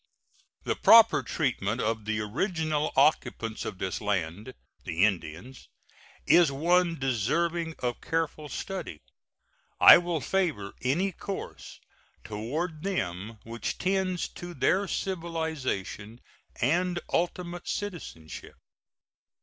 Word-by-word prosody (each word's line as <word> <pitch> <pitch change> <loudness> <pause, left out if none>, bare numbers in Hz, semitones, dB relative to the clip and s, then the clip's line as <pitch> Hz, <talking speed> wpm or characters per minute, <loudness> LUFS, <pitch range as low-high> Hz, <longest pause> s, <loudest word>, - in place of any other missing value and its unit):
The - - -1
proper 225 0 +7
treatment 120 -7 -1
of 110 -2 -1
the 110 0 -1
original 155 - -1
occupants 135 -5 +1
of - - -5
this 95 0 -3
land 105 +3 -2 0.3
the 85 +5 +2
Indians 95 +6 -4 0.6
is 170 -4 +5
one 170 +4 +2
deserving 160 +7 0
of 120 -1 -3
careful 160 -2 -2
study. 185 - -6 0.8
I - - +10
will 175 -2 -2
favor 150 - -1
any 170 +10 +1
course 195 +2 -7 0.4
toward 150 +10 -4
them 110 - -3
which 115 +1 -4
tends 185 -1 0
to 175 0 -9
their 195 +4 +2
civilization 160 - -3 0.4
and 175 +7 +1
ultimate 175 0 -2
citizenship. 175 - -6
150 Hz, 100 wpm, -28 LUFS, 110-175 Hz, 0.8 s, I